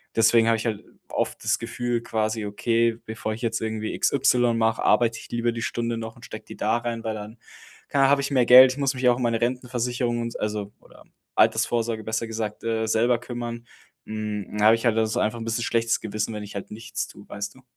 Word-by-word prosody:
deswegen 115 +1 +5
habe 115 0 +4
ich 110 - -5
halt 110 -3 -2 0.3
oft - - -2
das - - +1
Gefühl: 120 0 -2
„Quasi 110 -1 -2
okay, 115 +2 +1
bevor 110 0 -4
ich 115 +3 -8
jetzt 115 0 -1
irgendwie 110 -1 -3
XY 125 -3 +3
mache, 110 0 +1
arbeite 115 -2 +3
ich - - -12
lieber 120 0 0
die 115 0 -5
Stunde 115 0 -2
noch 115 0 -6
und 120 - -13
stecke 110 0 -9
die - - -11
da 110 +2 +1
rein“, 120 -1 -4
weil 110 - -2
dann, 110 +2 -8 0.5
keine 140 -1 +3
ah - - +4
habe 140 0 +4
ich 140 - -3
mehr 125 -3 +3
Geld, 130 +1 +10
ich 130 - -6
muss 135 -1 +1
mich 130 0 +1
auch 120 - +3
um - - -5
meine 115 -2 +1
Rentenversicherung 125 -1 -1
und 115 0 -5
also, 105 -1 -3
oder - - -18 0.3
Altersvorsorge 115 -2 +2
besser 110 +1 -2
gesagt, 110 -2 -5
äh, 115 -1 -1
selber 115 +2 +2
kümmern. 120 -1 -6 0.4
Hm, 105 -1 -5
da 105 - +2
habe 110 - +8
ich 115 - -5
halt 115 -2 +3
also 110 -1 +1
einfach 110 +2 0
'n - - -5
bisschen 115 +1 -1
schlechtes 115 0 +1
Gewissen, 110 +1 -3
wenn 105 - -5
ich 100 - -10
halt 100 - -6
nichts 110 -1 -5
tue, 100 - -14
weißt 100 +2 -5
du? 130 - -17
115 Hz, 230 wpm, -25 LUFS, 110-120 Hz, 0.5 s, Geld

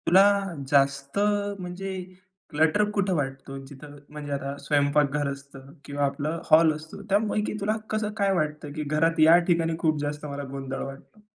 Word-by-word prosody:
तुला 185 +2 +7 0.5
जास्त 140 +1 +2 0.4
म्हणजे 185 +2 -5 0.6
क्लटर 160 +7 +3
कुठं 200 -2 0
वाटतो. 135 -1 -4
जिथं 145 +2 -12
म्हणजे 150 -1 -7
आता 140 0 -3
स्वयंपाकघर 145 0 +1
असतं 140 0 -11
किंवा 145 0 -1
आपलं 145 +4 -2
हॉल 160 0 +6
असतो. 155 +5 -10
त्यापैकी 210 +1 +1
तुला 210 +2 +1
कसं 215 -1 -1
काय 200 -1 +2
वाटतं, 150 -2 -2
की 155 0 -3
घरात 155 +3 +1
या 160 +2 +8
ठिकाणी 165 -1 +1
खूप 155 -2 +1
जास्त 145 +1 -4
मला 140 -1 -5
गोंधळ 135 -1 -5
वाटतो? 135 +10 -11
150 Hz, 155 wpm, -26 LUFS, 140-170 Hz, 0.6 s, या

